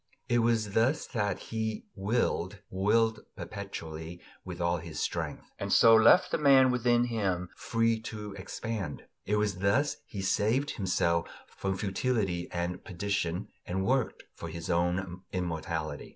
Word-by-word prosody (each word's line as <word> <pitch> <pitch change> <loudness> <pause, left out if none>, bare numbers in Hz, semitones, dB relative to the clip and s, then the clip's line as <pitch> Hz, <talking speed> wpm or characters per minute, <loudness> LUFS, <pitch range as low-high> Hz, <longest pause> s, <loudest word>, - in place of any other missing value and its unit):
It 120 - +3
was 115 -3 +2
thus 120 +8 +2
that 105 -6 -1
he 110 -1 -4
"willed, 100 -2 0
willed 110 +3 +2 0.2
perpetually, 85 -3 -7 0.2
with 90 -2 -7
all 85 0 +1
his 80 -1 -7
strength," - - -3
and - - -3
so 115 - +7
left 110 +11 +6
the - - +1
man 135 -3 +6
within 120 -1 +3
him 95 -7 -1
free 115 -1 +1
to 105 -2 -7
expand; 100 -3 -5 0.2
it 105 - +2
was 105 -3 0
thus 115 +10 +2
he 100 -2 -5
saved 115 +9 +1
himself 85 -3 0 0.2
from 95 -1 -3
futility 95 -3 -1
and 90 +1 -3
perdition 95 0 -2 0.2
and 95 +2 -1
worked 130 0 0
for 85 - -7
his 85 +2 -4
own 90 +1 0
immortality. 80 -4 -3
100 Hz, 140 wpm, -30 LUFS, 90-115 Hz, 0.2 s, so